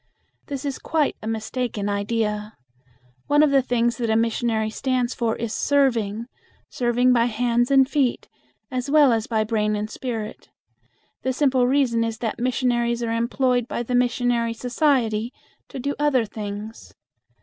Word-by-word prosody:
This 280 -1 -5
is 280 -2 -3
quite 310 -3 0
a 215 - -6
mistaken 225 -1 -3
idea. 210 +1 -2 0.7
One 295 +1 +4
of 300 - +3
the 275 -1 +5
things 240 -2 0
that 235 -2 -2
a 220 - +2
missionary 225 -1 0
stands 255 0 -1
for 230 -2 -1
is 230 -1 -4
serving, 235 -6 +1 0.5
serving 245 +1 +2
by 235 -1 +3
hands 240 +1 +1
and 270 -1 +5
feet 275 -4 0 0.4
as 255 +1 -3
well 290 -4 +5
as 225 -1 -1
by 220 -2 +1
brain 215 -1 0
and 210 +1 -4
spirit. 225 -4 -5 0.7
The 260 - -1
simple 260 -2 +2
reason 250 -4 +2
is 225 -1 -3
that 230 -1 -3
missionaries 240 -1 0
are 230 - -1
employed 245 +1 +1
by 240 - -3
the 250 - -4
missionary 245 -1 +1
society 240 -3 +1 0.4
to - - -9
do 280 +3 -2
other 280 -6 +2
things. 210 +1 -7
240 Hz, 155 wpm, -23 LUFS, 225-255 Hz, 0.7 s, the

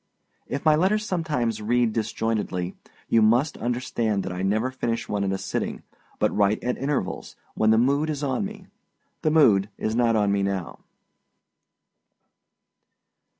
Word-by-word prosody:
If 140 +3 -4
my 155 - +6
letters 200 +6 +2
sometimes 150 - -1
read 120 +1 +1
disjointedly, 110 -5 -2 0.3
you 115 - +4
must 120 +7 +3
understand 120 -4 -1
that - - -4
I 90 +1 -4
never 110 +6 0
finish 115 -3 -2
one 100 -1 -1
at 95 - 0
a 95 - -1
sitting, - - -3 0.3
but - - +1
write 105 +1 +2
at 125 0 0
intervals, 135 -9 -3 0.2
when 110 - +2
the 110 - +5
mood 140 +6 +2
is 150 -1 -3
on 140 +7 0
me. 200 -1 -7 0.6
The 155 - +2
mood 110 -11 +4
is 110 +1 -2
not 120 -1 +3
on 105 -2 +2
me 100 0 +1
now. 100 -3 -3
115 Hz, 150 wpm, -25 LUFS, 105-140 Hz, 0.6 s, my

